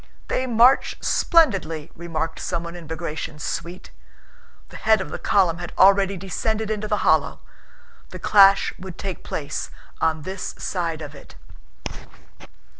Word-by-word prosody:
"They 260 - 0
march 245 +3 +4
splendidly," 185 - +2
remarked 165 -1 -4
someone 170 -1 -4
in 170 -3 -10
Bagratión's 155 -1 -5
suite. 175 +2 -5 0.8
The - - -10
head 220 -1 +3
of 190 - -5
the - - -5
column 180 -4 +2
had 175 -1 -7
already 195 0 +5
descended 215 +4 -2
into 215 0 -2
the 210 -1 -1
hollow. - - +2 0.7
The - - -8
clash 195 -1 +5
would 185 -2 -9
take 190 -3 -5
place 145 -1 -4 0.3
on 160 -1 +1
this 190 +3 -5
side 165 -4 -3
of 145 0 -8
it... 140 - -14
180 Hz, 135 wpm, -23 LUFS, 160-205 Hz, 0.8 s, already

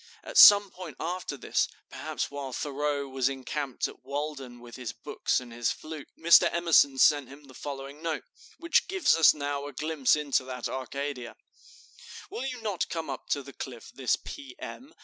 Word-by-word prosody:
At - - -9
some 205 -1 +9
time 185 - -9
after 175 -4 -4
this, - - 0 0.2
perhaps - - -4
while 140 -2 -6
Thoreau 145 +1 -2
was 135 0 0
encamped 135 0 -3
at - - -14
Walden 140 -3 -5
with 120 -1 -12
his 125 -3 -6
books - - -1
and 125 -2 -11
his 120 0 0
flute, 155 -2 -8
Mr. 170 +1 +6
Emerson 165 -5 +4
sent 145 -1 +4
him 140 +2 -13
the 135 -2 -15
following 140 +2 -7
note, 165 -1 -2 0.3
which 335 0 +2
gives 380 - +3
us 165 -1 +6
now 145 -1 -3
a 145 - -9
glimpse 150 -1 +2
into 145 -3 0
that 125 -2 -4
Arcadia: 130 -1 -5 1.0
"Will 265 - -4
you 255 -2 -5
not 205 -5 -2
come 160 -4 -4
up 130 - -8
to 140 - 0
the 140 +1 -11
Cliff 120 -3 -8
this 130 -2 +1
P. 285 +4 -10
M. 285 +6 -9
145 Hz, 180 wpm, -28 LUFS, 130-160 Hz, 1.0 s, some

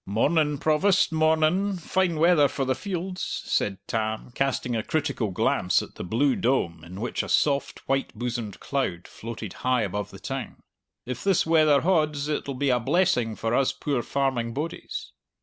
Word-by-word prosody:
"Mornin', 145 - +2
Provost, 185 +7 +3
mornin'! 160 +5 +2
Fine 180 +1 0
weather 160 -2 +5
for 135 0 -2
the 130 - +2
fields," 185 +3 -4
said 100 -2 0
Tam, 110 +1 -2
casting 130 -2 -1
a 110 - 0
critical 140 -6 -1
glance 90 - +1
at - - -11
the - - -7
blue 125 +9 +2
dome 85 -11 0
in 90 +3 -9
which 120 +3 -2
a - - -7
soft, 140 -2 +1
white 135 0 0
bosomed 120 -3 -4
cloud 95 -11 -2
floated 110 -3 -7
high 125 -2 +2
above 105 0 -3
the - - -11
town. - - -6 0.4
"If 125 -1 -5
this 195 -3 +3
weather 155 -3 +4
hauds, 155 -5 +1
it'll 140 -2 -2
be 140 +1 +1
a 125 - +3
blessing 120 -6 +1
for 115 +3 -2
us 135 +1 +2
poor 140 -2 -1
farming 125 -4 -1
bodies." 170 - -5
140 Hz, 165 wpm, -26 LUFS, 115-160 Hz, 0.4 s, weather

